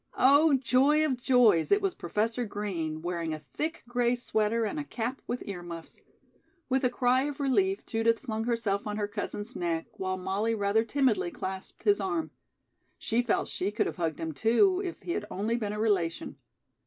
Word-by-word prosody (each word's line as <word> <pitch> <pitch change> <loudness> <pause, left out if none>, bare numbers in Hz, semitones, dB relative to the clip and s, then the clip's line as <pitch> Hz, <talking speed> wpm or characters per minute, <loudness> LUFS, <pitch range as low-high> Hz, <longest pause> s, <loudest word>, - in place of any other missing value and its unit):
Oh, 285 +3 +6
joy 270 +4 +3
of 275 -4 +1
joys, 240 -8 +4
it 405 - +6
was 390 -3 0
Professor 225 +7 -1
Green, 175 -8 -4
wearing 170 -2 -2
a 155 -1 -12
thick 320 +2 -3
gray 245 0 +1
sweater 225 -1 0
and 260 +8 -3
a - - -2
cap 250 -2 -4
with 245 - -3
ear 190 -3 -5
muffs. 170 -1 -9 0.7
With 265 +1 +1
a 250 - +4
cry 250 +2 +2
of 290 -1 -5
relief, 380 +9 +1
Judith 225 0 +1
flung 225 -3 -3
herself 230 -4 0
on 210 0 -3
her 205 -1 -1
cousin's 205 +3 -5
neck 165 -2 -1
while 185 0 -2
Molly 195 +5 -1
rather 205 +1 +2
timidly 240 -5 +1
clasped 190 +2 -7
his 410 -1 +4
arm. 330 -4 -2 0.7
She 230 +2 0
felt 240 -3 0
she 190 - -2
could 210 - 0
have - - -4
hugged 165 -3 -2
him, 165 -1 -3
too, 240 - +3
if 355 -3 -5
he 345 - -3
had 210 - -2
only 215 +5 -1
been 215 -4 -2
a 210 - -4
relation. 190 -7 0
225 Hz, 190 wpm, -29 LUFS, 195-260 Hz, 0.7 s, Oh